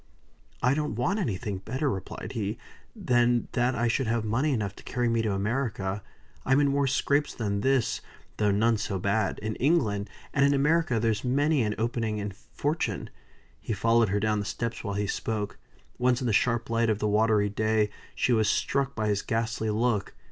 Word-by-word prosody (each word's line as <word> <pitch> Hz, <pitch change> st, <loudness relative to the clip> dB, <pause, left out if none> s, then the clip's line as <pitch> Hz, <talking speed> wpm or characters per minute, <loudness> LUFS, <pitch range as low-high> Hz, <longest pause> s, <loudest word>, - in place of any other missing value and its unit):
"I 125 Hz, +2 st, +4 dB
don't 150 Hz, -2 st, -1 dB
want 175 Hz, -, 0 dB
anything 105 Hz, -, -2 dB
better," 125 Hz, +9 st, -2 dB
replied 95 Hz, -8 st, -4 dB
he, 105 Hz, -3 st, -2 dB, 0.4 s
"than 120 Hz, -1 st, +2 dB
that 125 Hz, +1 st, +1 dB
I 120 Hz, +2 st, +1 dB
should 120 Hz, +2 st, 0 dB
have 115 Hz, -1 st, 0 dB
money 130 Hz, +8 st, +1 dB
enough 105 Hz, -6 st, -1 dB
to -, -, -12 dB
carry 120 Hz, 0 st, -1 dB
me 115 Hz, -1 st, +2 dB
to 110 Hz, -2 st, 0 dB
America. 105 Hz, -2 st, -1 dB, 0.4 s
I'm 135 Hz, +2 st, +3 dB
in 145 Hz, -1 st, +3 dB
more 140 Hz, 0 st, +2 dB
scrapes 140 Hz, +2 st, +1 dB
than 100 Hz, -3 st, -1 dB
this 135 Hz, -1 st, +1 dB, 0.4 s
(though 105 Hz, -1 st, +2 dB
none 110 Hz, +3 st, +3 dB
so 105 Hz, -2 st, -2 dB
bad) 100 Hz, +4 st, 0 dB
in 110 Hz, 0 st, -2 dB
England; 110 Hz, -9 st, +1 dB, 0.2 s
and 140 Hz, -, +3 dB
in 140 Hz, 0 st, +4 dB
America 145 Hz, -3 st, +2 dB
there's 110 Hz, -1 st, 0 dB
many 140 Hz, +3 st, +2 dB
an 105 Hz, -2 st, 0 dB
opening 115 Hz, -1 st, -1 dB
to -, -, -16 dB
fortune." 150 Hz, +9 st, -3 dB, 0.5 s
He -, -, -3 dB
followed 115 Hz, +1 st, +3 dB
her 100 Hz, +1 st, +1 dB
down 105 Hz, 0 st, +1 dB
the 105 Hz, -, -3 dB
steps 115 Hz, +4 st, -3 dB
while 100 Hz, -3 st, -3 dB
he 105 Hz, 0 st, 0 dB
spoke. 105 Hz, 0 st, -3 dB, 0.4 s
Once 125 Hz, 0 st, +3 dB
in 130 Hz, -, -3 dB
the 115 Hz, -4 st, +2 dB
yellow 120 Hz, -1 st, 0 dB
light 115 Hz, 0 st, +2 dB
of 110 Hz, -, +2 dB
the 105 Hz, -, -1 dB
watery 105 Hz, 0 st, +3 dB
day, 110 Hz, 0 st, +1 dB, 0.2 s
she 125 Hz, -, +2 dB
was 110 Hz, -2 st, +3 dB
struck 140 Hz, 0 st, 0 dB
by 110 Hz, 0 st, -1 dB
his 105 Hz, -1 st, +1 dB
ghastly 115 Hz, -1 st, -1 dB
look. 110 Hz, -1 st, 0 dB
115 Hz, 190 wpm, -27 LUFS, 105-125 Hz, 0.5 s, I